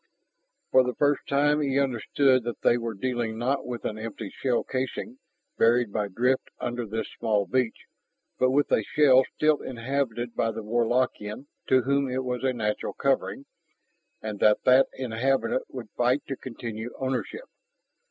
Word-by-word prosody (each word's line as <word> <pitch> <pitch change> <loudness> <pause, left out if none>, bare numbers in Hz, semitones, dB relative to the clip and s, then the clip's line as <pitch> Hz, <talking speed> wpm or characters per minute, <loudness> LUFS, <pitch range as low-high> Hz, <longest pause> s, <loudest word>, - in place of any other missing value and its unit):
For 130 - +6
the 125 0 -3
first 145 -1 +1
time 145 +2 +2
he 135 -2 0
understood 130 0 +2
that 120 - -4
they - - +5
were 115 -2 -3
dealing 120 0 -2
not 130 +4 -1
with 120 -1 -5
an 110 0 -3
empty 110 -2 -6
shell 125 -3 0
casing 135 - -4 0.4
buried 115 -2 +3
by 105 -1 0
drift 125 +7 0
under 120 -1 -3
this 110 +2 -3
small 105 -3 +1
beach, 125 -3 -1 0.5
but 130 - +4
with 140 +2 +2
a - - +4
shell 135 +2 +5
still 155 -1 +2
inhabited 120 -1 -3
by 115 0 0
the 110 - -6
Warlockian 120 0 0 0.2
to 130 -1 +4
whom 140 +1 +1
it 130 +1 -2
was 125 0 -3
a 130 - +2
natural 105 -4 -2
covering, - - -1 0.8
and 105 -2 -4
that 105 0 +4
that 130 +1 +6
inhabitant 130 0 0
would 120 -5 -8
fight 125 +3 +2
to 135 - -2
continue 115 -2 -6
ownership. 135 - -3
125 Hz, 160 wpm, -26 LUFS, 115-135 Hz, 0.8 s, For